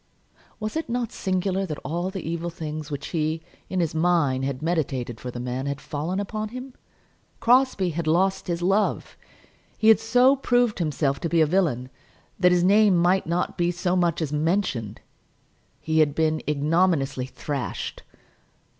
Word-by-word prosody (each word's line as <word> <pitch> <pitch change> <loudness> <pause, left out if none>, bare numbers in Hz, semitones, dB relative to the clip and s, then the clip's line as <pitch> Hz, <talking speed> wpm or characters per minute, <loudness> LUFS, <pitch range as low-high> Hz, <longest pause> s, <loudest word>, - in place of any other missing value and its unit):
Was 215 +3 -4
it 320 -5 -3
not 240 -1 -2
singular 190 0 -1
that 150 -3 -4
all 175 +4 -2
the 190 -4 -6
evil 170 +1 -2
things 155 -3 -6
which 145 -2 -5
he, 160 -1 -1 0.3
in 185 - -1
his 165 -3 0
mind, 160 -6 +2
had 135 0 -3
meditated 135 -8 -2
for 125 - -6
the 120 - -6
man, 125 +2 -3
had 140 0 -3
fallen 160 +6 -3
upon 215 +1 -3
him. 255 +2 -8 0.7
Crosbie 245 -7 +3
had 165 0 -3
lost 190 +4 +1
his 175 -1 -2
love! 195 +4 +1 0.6
He 220 - +4
had 220 - +7
so 250 +4 +4
proved 245 -5 +1
himself 145 -4 0
to 165 - -2
be 170 - +2
a 160 - +6
villain 150 -7 0 0.5
that 180 -1 +5
his 175 -1 +3
name 200 0 +5
might 180 +2 +2
not 175 +2 -1
be 175 0 +2
so 180 +1 -1
much 175 -2 +1
as 150 -1 -4
mentioned! 150 - -1 0.8
He 160 0 0
had 150 -2 +3
been 155 -1 +1
ignominiously 150 -3 +1
thrashed! 135 - -5
170 Hz, 165 wpm, -24 LUFS, 150-190 Hz, 0.8 s, had